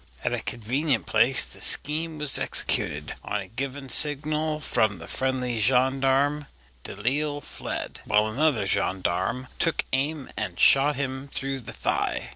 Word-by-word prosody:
At - - -1
a - - -1
convenient 130 +6 -2
place 130 +3 +3
the - - -9
scheme 155 +2 +3
was 150 -2 +2
executed. 75 +1 -1
On 105 - -2
a 95 - -7
given 135 +5 -6
signal 150 +3 +4
from 110 -9 0
the 80 - -10
friendly 125 +1 -1
gendarme, 135 +4 +2 0.4
Delisle 145 +3 -2
fled, - - -6
while 105 +1 +3
another 120 0 +1
gendarme 95 +6 -1
took 165 - 0
aim 140 +1 -1
and 95 -4 -4
shot 145 +2 +5
him 135 0 -4
through 135 0 -4
the 120 - -9
thigh. - - -2
135 Hz, 140 wpm, -25 LUFS, 115-145 Hz, 0.4 s, shot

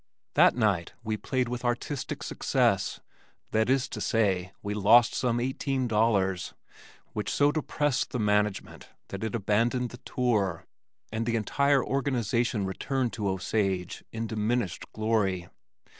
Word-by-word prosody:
That - - +5
night 100 -8 +1
we 110 -1 -1
played 125 +4 -1
with 125 +1 -4
"artistic 125 +3 -2
success" - - 0 0.5
that 110 +2 +2
is 135 0 +2
to - - -6
say, 95 -6 +1
we 105 0 -2
lost 110 +3 +5
some 120 -2 0
eighteen 130 +1 -1
dollars, 95 - +1 0.6
which 105 - -3
so 145 0 +3
depressed 145 -2 0
the - - -3
management 105 -2 0 0.2
that - - -5
it 110 +2 -2
abandoned 115 +4 +1
the 125 - -9
tour, 105 -10 -1 0.5
and 110 +1 -2
the 115 - +1
entire 140 +5 +2
organization 120 -5 0
returned 125 +6 -2
to 105 -3 -1
Osage 95 -1 -1
in 115 0 -3
diminished 110 -3 -2
glory. 105 -5 0
110 Hz, 135 wpm, -28 LUFS, 100-125 Hz, 0.6 s, That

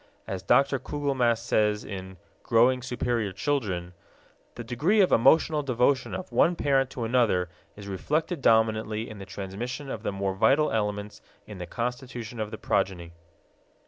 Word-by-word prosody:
As 95 -1 -4
Dr. 135 +8 +3
Kugelmass 130 -5 0
says 105 -3 +1
in 95 -2 -7 0.2
Growing 125 +3 +3
Superior 120 -4 -1
Children, 95 -6 -2 0.6
"The 120 - -6
degree 150 - +1
of 190 - +4
emotional 150 +5 +4
devotion 130 0 +1
of 185 - -7
one 175 - +3
parent 135 -4 +1
to 125 - -5
another 115 -7 +2 0.3
is 100 -1 -10
reflected 155 - -2
dominantly 110 -1 +2
in 110 -2 -9
the 95 - -9
transmission 115 +9 -6
of 110 - -5
the 110 - -2
more 100 -1 -2
vital 140 +10 +3
elements 105 -1 -2 0.2
in 105 -3 -10
the 90 - -6
constitution 120 0 -5
of 110 -1 -2
the 110 - -7
progeny." 90 -5 -1
115 Hz, 150 wpm, -27 LUFS, 100-135 Hz, 0.6 s, of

